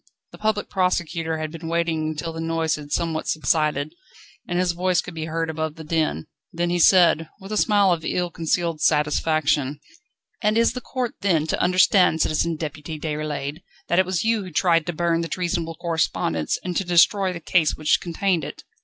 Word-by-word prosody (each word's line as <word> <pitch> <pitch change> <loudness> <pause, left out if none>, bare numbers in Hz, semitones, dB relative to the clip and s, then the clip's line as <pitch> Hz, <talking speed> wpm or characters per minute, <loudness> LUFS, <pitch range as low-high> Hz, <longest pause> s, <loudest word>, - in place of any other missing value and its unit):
The - - -13
Public 215 -1 0
Prosecutor 170 -3 -1
had 155 -1 -4
been 165 0 -8
waiting 165 -1 0
until 155 +1 -4
the 160 - -7
noise 165 -1 0
had 145 -1 -6
somewhat 165 -1 -1
subsided, 155 -1 0 0.5
and 175 - -2
his 180 -1 +2
voice 180 +1 +1
could 180 - -5
be 160 -1 -4
heard 165 +1 -2
above 160 -1 -3
the 160 - -9
din, 155 - -1 0.3
then 175 +1 -1
he 175 - 0
said, 165 -3 +5
with 195 +1 -10
a - - -1
smile 205 -2 +3
of 165 -2 0
ill 175 +1 -1
concealed 165 -1 -1
satisfaction: 150 -2 +1 0.6
"And 210 +1 +2
is 230 - +3
the 250 - -5
court, 250 -2 -3
then, 170 -6 +2
to 160 - -1
understand, 180 -2 +4
Citizen 165 +2 0
Deputy 155 0 -6
Déroulède, 150 0 -4 0.3
that 175 - +3
it 185 - +3
was 185 -3 -1
you 225 -1 +1
who 185 - -7
tried 165 -1 +2
to 175 - -2
burn 170 0 0
the 165 - -3
treasonable 170 -2 -2
correspondence 95 - -1
and 180 -1 -4
to - - +1
destroy 185 +2 +3
the 175 - -6
case 165 -2 +2
which 155 0 +2
contained 175 0 0
it?" - - -8
165 Hz, 190 wpm, -23 LUFS, 155-180 Hz, 0.6 s, said